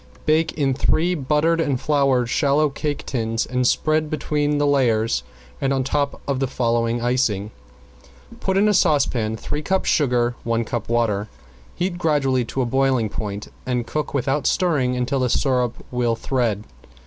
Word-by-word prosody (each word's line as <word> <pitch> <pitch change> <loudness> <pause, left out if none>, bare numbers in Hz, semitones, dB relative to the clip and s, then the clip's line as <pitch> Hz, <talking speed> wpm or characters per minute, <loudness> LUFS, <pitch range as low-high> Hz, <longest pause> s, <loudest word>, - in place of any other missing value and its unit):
Bake 155 +1 +2
in 140 -3 +1
three 165 +6 +1
buttered 155 +2 +1
and 140 -5 0
floured 135 -5 +2
shallow 145 +4 +2
cake 145 +1 -4
tins, 115 -3 -1
and 125 -1 0
spread 155 +2 +1
between 150 0 0
the 145 - +2
layers 115 - +2 0.4
and 135 - +1
on 135 -1 +1
top 140 +1 -1
the 135 -1 -1
following 120 -1 0
icing: 115 -5 0 0.9
Put 190 0 0
in 205 +2 +4
a 210 - +3
saucepan 135 - +2
three 150 - -4
cups 190 +4 0
sugar, 125 -4 +2
one 115 0 0
cup 120 +1 -4
water. 110 -3 +1 0.5
Heat 175 0 -2
gradually 135 -6 +1
to 130 - -3
the - - +1
boiling 130 -2 +1
point, 100 0 -5
and 125 -2 -1
cook 150 +5 -3
without 140 +1 0
stirring 145 -9 +1
until 125 +2 -1
the 125 -1 +1
syrup 125 -2 +1 0.2
will 120 -2 +1
thread. 115 -5 -1
130 Hz, 160 wpm, -22 LUFS, 120-150 Hz, 0.9 s, in